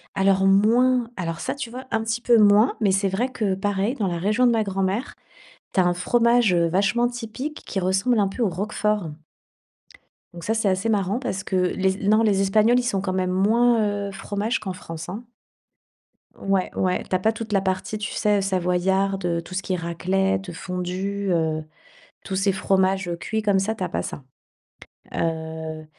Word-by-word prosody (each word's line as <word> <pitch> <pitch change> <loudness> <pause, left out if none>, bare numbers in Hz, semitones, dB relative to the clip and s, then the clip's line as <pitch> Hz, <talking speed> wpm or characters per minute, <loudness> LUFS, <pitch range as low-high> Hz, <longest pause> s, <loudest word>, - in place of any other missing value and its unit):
Alors, 195 0 +3
moins 230 +5 +3
alors 165 -2 -3
ça, - - -3
tu 275 -4 -5
vois, 255 +3 -8
un 225 0 0
petit 225 +2 -2
peu 235 -1 +4
moins. 210 +3 +5
Mais 200 - +3
c'est 195 +1 +1
vrai 225 +7 -1
que, 205 -6 -1
pareil, 205 +4 -1
dans 210 -7 -1
la 175 -2 -2
région 210 +8 +2
de - - +4
ma 225 -2 +2
grand-mère, 195 +5 -2 0.6
tu - - +1
as 185 - +4
un 175 - +2
fromage, 235 +3 +3
heu, 170 -1 +3
vachement 200 +7 +2
typique, 245 +5 -6
qui 195 - -3
ressemble 195 +6 +1
un 200 - +3
peu 195 +6 -6
au 210 - +2
roquefort. 210 -1 -1 1.2
Donc 170 -1 -10
ça, 220 - 0
c'est 220 -2 0
assez 190 +4 0
marrant, 205 +1 0
parce 190 -7 -3
que - - -3
les 190 +1 +1
Es - - -1
non, 215 +2 +5
les 205 -3 +2
Espagnols, 215 +5 +4
ils - - -1
sont 200 -6 -1
quand 190 -1 -2
même 185 -1 0
moins, 230 +5 +3 0.3
heu, - - -8
fromages 205 +4 -2
qu'en 190 -3 -5
France, 165 -2 -8
hein. 210 +6 -6 1.1
Ouais, 195 -1 0
ouais, 185 -1 0
tu - - -2
as - - +1
pas 220 +4 +2
toute 220 -1 -7
la 195 -2 +2
partie, 190 +3 -2
tu 210 -1 -4
sais, 210 -1 +1
savoyarde, 190 +1 0
heu, 170 -1 0
tout 170 - -12
ce 195 - -2
qui 185 - -2
est - - +2
raclette, 185 +2 -1
fondue, 185 +3 -3
heu, 160 -2 0 0.6
tous 190 - -4
ces 195 +1 +2
fromages 190 -1 +1
cuits 220 +4 -2
comme 205 -2 +2
ça, 205 +3 0
tu 215 - -5
as 180 - -2
pas - - -2
ça. 140 - -7 0.9
Heu, 160 -1 -3
195 Hz, 200 wpm, -23 LUFS, 185-220 Hz, 1.2 s, moins